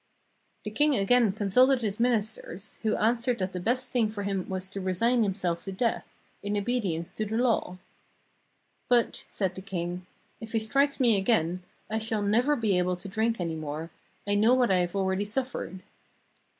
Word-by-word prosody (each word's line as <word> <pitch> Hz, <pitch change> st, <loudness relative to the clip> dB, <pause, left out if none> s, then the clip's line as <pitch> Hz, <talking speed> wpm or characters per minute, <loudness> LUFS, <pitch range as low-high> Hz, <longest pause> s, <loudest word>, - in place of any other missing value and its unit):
" -, -, -41 dB
The -, -, -4 dB
king 295 Hz, -1 st, +3 dB
again 230 Hz, +1 st, +4 dB
consulted 245 Hz, +6 st, +3 dB
his 210 Hz, 0 st, -2 dB
ministers, 220 Hz, -4 st, -2 dB
who 220 Hz, -1 st, +1 dB
answered 235 Hz, +2 st, +1 dB
that 185 Hz, -1 st, -3 dB
the 180 Hz, -, -3 dB
best 250 Hz, +7 st, -1 dB
thing 230 Hz, -4 st, +2 dB
for 210 Hz, -1 st, -5 dB
him 195 Hz, -2 st, -2 dB
was 185 Hz, 0 st, -3 dB
to 195 Hz, 0 st, -5 dB
resign 230 Hz, +7 st, +2 dB
himself 185 Hz, -5 st, -1 dB
to 195 Hz, -, -4 dB
death, 225 Hz, +4 st, -2 dB, 0.3 s
in 205 Hz, +1 st, -2 dB
obedience 200 Hz, -7 st, -1 dB
to 215 Hz, -, -3 dB
the 220 Hz, +2 st, -2 dB
law. 230 Hz, -7 st, +1 dB, 1.1 s
'But,' 240 Hz, -1 st, +2 dB
said 190 Hz, -3 st, -1 dB
the 190 Hz, -, -8 dB
king, 180 Hz, -1 st, -4 dB, 0.3 s
*if 225 Hz, 0 st, -9 dB
he -, -, +2 dB
strikes 275 Hz, +7 st, +1 dB
me 235 Hz, -5 st, +5 dB
again, 185 Hz, -4 st, +1 dB, 0.3 s
I 220 Hz, +1 st, -1 dB
shall 220 Hz, -1 st, -1 dB
never 240 Hz, +8 st, +3 dB
be 215 Hz, -8 st, +1 dB
able 180 Hz, 0 st, +1 dB
to 180 Hz, +3 st, -8 dB
drink 220 Hz, +3 st, 0 dB
any 170 Hz, -2 st, -2 dB
more; 155 Hz, +1 st, -5 dB, 0.3 s
I 205 Hz, -, 0 dB
know 220 Hz, +5 st, +5 dB
what 245 Hz, -4 st, +3 dB
I 185 Hz, -, +4 dB
have 175 Hz, +1 st, -1 dB
already 190 Hz, 0 st, 0 dB
suffered.' 215 Hz, -4 st, -3 dB
205 Hz, 185 wpm, -28 LUFS, 185-235 Hz, 1.1 s, me